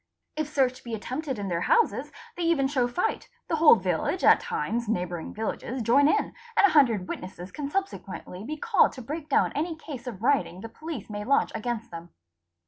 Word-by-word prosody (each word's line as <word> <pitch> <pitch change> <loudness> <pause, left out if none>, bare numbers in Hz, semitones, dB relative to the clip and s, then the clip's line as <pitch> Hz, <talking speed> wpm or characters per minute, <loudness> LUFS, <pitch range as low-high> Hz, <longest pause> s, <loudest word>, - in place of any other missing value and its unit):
If 305 -1 -2
search 260 -4 +1
be 235 -2 -4
attempted 260 +5 -4
in 200 -1 -4
their 170 -2 -1
houses 470 -1 +2 0.2
they - - -5
even 330 -5 +2
show 260 -3 +1
fight, 360 - -2 0.2
the 325 - 0
whole 310 -4 +8
village, 185 - -1
at - - +7
times 240 - -2
neighbour 180 -4 -1
ing - - -7
villages, 230 +3 -4
join 275 +6 +5
in, 420 +7 +1 0.2
and 410 - +7
a 395 - +4
hundred 235 -11 +4
witnesses 185 0 -7
can 290 -2 -4
subsequently 380 - -4
be 305 +7 -5
called 440 +6 +3
'to 255 - -9
break 305 +5 -6
down 275 - +3
any 320 +3 -2
case 285 -6 -9
of 220 -4 -6
rioting 245 -9 +1
the 225 - -7
police 310 -4 -7
may 210 -1 -5
launch 275 +6 +2
against 230 +1 -4
them. 170 0 -8
255 Hz, 200 wpm, -27 LUFS, 215-310 Hz, 0.2 s, whole